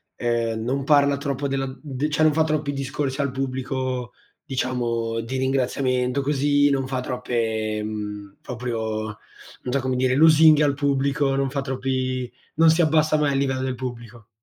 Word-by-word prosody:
ehm, 115 Hz, -2 st, -1 dB
non 135 Hz, +3 st, -2 dB
parla 140 Hz, -1 st, +4 dB
troppo 140 Hz, 0 st, -3 dB
della 135 Hz, 0 st, -1 dB
mhmm, 130 Hz, -, -9 dB
d 145 Hz, 0 st, -2 dB
cioè, 155 Hz, +1 st, +1 dB
non 155 Hz, -, +5 dB
fa 160 Hz, +1 st, +2 dB
troppi 155 Hz, -2 st, -1 dB
discorsi 135 Hz, 0 st, -3 dB
al 140 Hz, -2 st, 0 dB
pubblico, 130 Hz, -1 st, -3 dB, 0.3 s
diciamo, 120 Hz, -4 st, -2 dB
di 115 Hz, +3 st, -4 dB
ringraziamento, 130 Hz, 0 st, 0 dB
così, 145 Hz, +1 st, +2 dB
non 135 Hz, -2 st, 0 dB
fa 130 Hz, -1 st, -2 dB
troppe, 115 Hz, -4 st, -2 dB
mhmm, 105 Hz, -2 st, -6 dB
proprio, 110 Hz, -3 st, -3 dB, 0.6 s
non 125 Hz, -, -3 dB
so 140 Hz, -, +1 dB
come 130 Hz, 0 st, -1 dB
dire, 130 Hz, 0 st, +2 dB
lusinghe 155 Hz, 0 st, +6 dB
al 145 Hz, -1 st, +3 dB
pubblico, 140 Hz, 0 st, +1 dB
non 135 Hz, 0 st, 0 dB
fa 140 Hz, +1 st, -3 dB
troppi 130 Hz, -1 st, -2 dB, 0.2 s
non 165 Hz, +1 st, +5 dB
si 160 Hz, +2 st, +4 dB
abbassa 155 Hz, -1 st, +3 dB
mai 145 Hz, -2 st, +1 dB
al -, -, +1 dB
livello 135 Hz, -1 st, 0 dB
del 130 Hz, -1 st, -2 dB
pubblico. 120 Hz, -2 st, -8 dB
130 Hz, 170 wpm, -23 LUFS, 125-140 Hz, 0.6 s, lusinghe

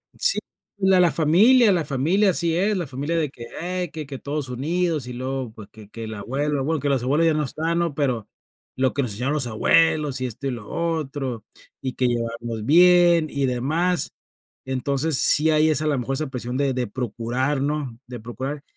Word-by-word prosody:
Sí, -, -, +5 dB, 0.4 s
la 190 Hz, -2 st, +3 dB
la 175 Hz, -2 st, +4 dB
familia 210 Hz, -, +5 dB
la 175 Hz, -4 st, +1 dB
familia 160 Hz, +10 st, +2 dB
así 170 Hz, -1 st, 0 dB
es, 200 Hz, +4 st, +1 dB
la 175 Hz, -4 st, -3 dB
familia 140 Hz, +5 st, -3 dB
de 155 Hz, -3 st, 0 dB
que: 120 Hz, -3 st, -11 dB, 0.2 s
"Ey, 180 Hz, 0 st, -3 dB
que 155 Hz, -2 st, -6 dB
que 135 Hz, -1 st, -6 dB
todos 145 Hz, -2 st, -4 dB
unidos" 155 Hz, +2 st, -1 dB
y 125 Hz, -, -6 dB
luego, 130 Hz, -1 st, -4 dB
pues, 110 Hz, -3 st, -12 dB
que 110 Hz, -2 st, -15 dB
que 115 Hz, 0 st, -7 dB
la 110 Hz, -1 st, -7 dB
abuela, 140 Hz, +6 st, -2 dB
bueno, 155 Hz, +3 st, -1 dB
que 140 Hz, +1 st, -1 dB
los 135 Hz, -3 st, +1 dB
abuelos 145 Hz, +6 st, +2 dB
ya 160 Hz, -, +3 dB
no 150 Hz, 0 st, 0 dB
están, 160 Hz, +4 st, -1 dB
¿no?, 170 Hz, -3 st, -1 dB
pero 125 Hz, -7 st, -1 dB, 0.5 s
lo 130 Hz, 0 st, +1 dB
que 140 Hz, -, 0 dB
nos 125 Hz, -5 st, -2 dB
enseñaron 125 Hz, +8 st, -1 dB
los 135 Hz, -5 st, 0 dB
abuelos 145 Hz, +4 st, +2 dB
y 130 Hz, -, -1 dB
esto 125 Hz, +4 st, -6 dB
y -, -, -1 dB
lo 115 Hz, -4 st, -8 dB
otro, 145 Hz, -8 st, -3 dB, 0.4 s
y 130 Hz, -1 st, -3 dB
que 125 Hz, -, 0 dB
llevarnos 115 Hz, -1 st, -3 dB
bien 175 Hz, +1 st, +5 dB
y 140 Hz, -1 st, -1 dB
demás. 160 Hz, +8 st, 0 dB, 0.5 s
Entonces, 135 Hz, +3 st, 0 dB
sí 155 Hz, +5 st, +5 dB
hay 155 Hz, 0 st, +4 dB
esa 155 Hz, 0 st, +1 dB
a -, -, +1 dB
lo 145 Hz, -2 st, +1 dB
mejor 135 Hz, +3 st, -2 dB
esa 155 Hz, +3 st, -1 dB
presión 125 Hz, -1 st, -4 dB
de 140 Hz, -1 st, +1 dB
de 125 Hz, -1 st, -2 dB
procurar, 125 Hz, +5 st, -2 dB
¿no?, 140 Hz, -4 st, -2 dB
de 125 Hz, -1 st, -8 dB
procurar. 130 Hz, +5 st, -6 dB
140 Hz, 210 wpm, -23 LUFS, 125-160 Hz, 0.5 s, Sí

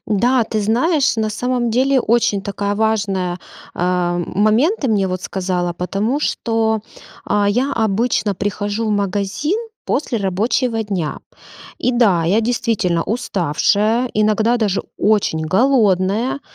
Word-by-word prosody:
Да, 240 Hz, +4 st, +2 dB
ты 215 Hz, -1 st, -2 dB
знаешь, 255 Hz, -, +1 dB
на 215 Hz, -1 st, 0 dB
самом 245 Hz, +1 st, -1 dB
деле 260 Hz, +3 st, +2 dB
очень 220 Hz, -4 st, +1 dB
такая 200 Hz, 0 st, -2 dB
важная, 200 Hz, -5 st, 0 dB, 0.4 s
э-э, 175 Hz, 0 st, 0 dB
момент 225 Hz, -, +2 dB
ты 270 Hz, -, 0 dB
мне 200 Hz, -4 st, +1 dB
вот 185 Hz, 0 st, -4 dB
сказала. 180 Hz, -2 st, -2 dB
Потому 200 Hz, -, -2 dB
что, 225 Hz, -5 st, 0 dB, 0.4 s
а, 205 Hz, 0 st, +1 dB
я 255 Hz, +7 st, 0 dB
обычно 220 Hz, -1 st, 0 dB
прихожу 205 Hz, +3 st, -2 dB
в -, -, 0 dB
магазин 205 Hz, -, -1 dB, 0.3 s
после 255 Hz, -5 st, -1 dB
рабочего 220 Hz, +5 st, 0 dB
дня. 190 Hz, -7 st, -3 dB, 0.6 s
И 250 Hz, -, 0 dB
да, 200 Hz, -9 st, +3 dB
я 195 Hz, +7 st, +2 dB
действительно 220 Hz, -7 st, 0 dB
уставшая, 215 Hz, +3 st, 0 dB
иногда 215 Hz, +3 st, +2 dB
даже 205 Hz, -4 st, 0 dB, 0.2 s
очень 205 Hz, -7 st, +1 dB
голодная, 210 Hz, -, +2 dB
215 Hz, 125 wpm, -18 LUFS, 195-235 Hz, 0.6 s, да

